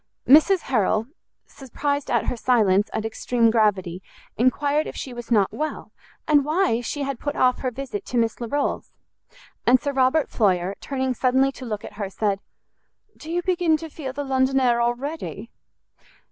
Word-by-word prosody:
Mrs 315 +7 +6
Harrel, 215 -3 +1 0.4
surprised 285 +2 -4
at - - +1
her - - -1
silence 215 -5 +2
and 220 - -3
extreme 230 +1 +1
gravity, 195 -5 +1 0.3
enquired 285 +5 +1
if - - -7
she 260 - -6
was 240 -1 -8
not 210 -5 +2
well, 310 +1 -4 0.4
and 295 -2 +4
why 305 -5 +1
she 280 +5 -4
had 275 -3 -4
put 290 - -3
off 250 -1 +2
her 255 - -1
visit 245 -4 -6
to 250 - -2
Miss 230 0 0
Larolles? 280 +5 -2 0.8
And 250 +1 +6
Sir 285 +3 -3
Robert 265 +3 +2
Floyer, 185 -4 +1
turning 265 -2 -2
suddenly 260 +2 +2
to 265 -1 -10
look 215 -2 -5
at - - -10
her, 200 - -2
said, 200 0 -1 0.8
"Do 310 - -11
you 350 +1 -1
begin 350 -3 +2
to 320 0 -9
feel 275 -4 -6
the 285 +2 -4
London 265 0 +1
air 240 -2 +2
already?" 255 +7 -3
255 Hz, 170 wpm, -23 LUFS, 225-285 Hz, 0.8 s, Mrs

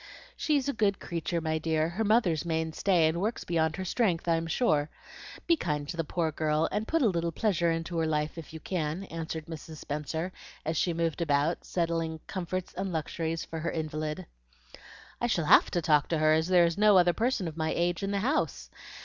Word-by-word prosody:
"She 305 -2 +1
is 275 - -1
a 280 - 0
good 205 -3 +1
creature, 170 0 -2
my 160 0 -1
dear, 160 0 0
her 190 +6 -2
mother's 205 -8 +2
main 160 -1 -1
stay, 175 -2 +3
and 165 +2 -1
works 220 +4 -1
beyond 160 -2 0
her 190 - -4
strength, 180 -4 0
I 170 - +4
am 165 0 -2
sure. 155 -5 +1 0.6
Be 335 - +4
kind 150 - -2
to 170 - -5
the 165 - -1
poor 160 +1 -1
girl, 155 +1 +1
and 215 +1 -2
put 325 -2 +2
a - - +5
little 170 -3 0
pleasure 170 -2 +1
into 165 +1 -2
her 160 - +1
life 150 -1 -1
if 165 -3 -9
you 160 - -8
can," 165 +1 -2
answered 160 -1 -4
Mrs. 160 -1 -8
Spenser, 155 +4 -4 0.3
as 160 +1 -1
she 175 - +1
moved 165 0 -1
about, 150 +1 +1
settling 165 -2 -1
comforts 185 0 -4
and 190 +1 -3
luxuries 165 0 -2
for 165 - -6
her 165 +1 -2
invalid. 155 -1 -3 1.0
"I 240 - +2
shall 170 -9 0
HAVE - - +6
to 175 - -1
talk 150 -3 +3
to 165 - 0
her, 155 0 +4
as 160 +1 +2
there 180 -2 +5
is 170 +3 -1
no 210 -2 +6
other 175 -1 +5
person 230 -4 0
of 160 - -6
my 160 -1 -1
age 175 +1 0
in 195 - -2
the 200 -1 0
house. 270 +8 -1
165 Hz, 215 wpm, -29 LUFS, 160-185 Hz, 1.0 s, HAVE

